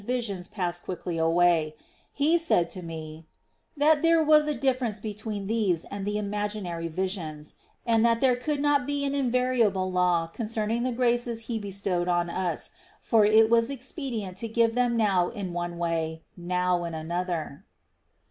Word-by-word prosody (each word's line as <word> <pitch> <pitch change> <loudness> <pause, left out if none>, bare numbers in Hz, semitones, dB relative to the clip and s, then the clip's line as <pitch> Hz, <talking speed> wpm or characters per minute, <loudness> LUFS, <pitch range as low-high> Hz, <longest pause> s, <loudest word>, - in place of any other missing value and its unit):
visions 205 -6 -2
pass 180 -4 -3
quickly 175 -2 -5
away; 165 -1 +3 0.4
He 310 +5 +2
said 180 - +2
to 185 - -4
me 160 -1 -8 0.5
"that 295 +1 +4
there 330 -1 +4
was 305 0 +5
a 300 - 0
difference 250 -5 0
between 210 -1 -5
these 200 -6 0
and 200 0 -4
the 210 0 -1
imaginary 205 -5 -3
visions, 165 -4 -4 0.3
and 230 -1 +3
that 230 -1 +3
there 255 -1 +3
could 285 +4 -2
not 285 -3 +2
be 285 0 -1
an 275 - -1
invariable 245 -8 +1
law 180 -2 +2
concerning 220 +5 -2
the 255 +1 0
graces 240 -1 0
He 225 0 -3
bestowed 195 -3 -2
on 175 -1 +1
us; 185 0 -2 0.3
for 220 -3 +3
it 220 +1 +6
was 230 +1 +3
expedient 255 - -4
to 230 - -3
give 230 0 +2
them 245 -1 +1
now 195 -5 +2
in 195 -5 -5
one 175 0 -4
way, 165 -1 -2
now 180 0 0
in 170 -1 -4
another." 165 -2 -4
205 Hz, 160 wpm, -27 LUFS, 175-240 Hz, 0.5 s, it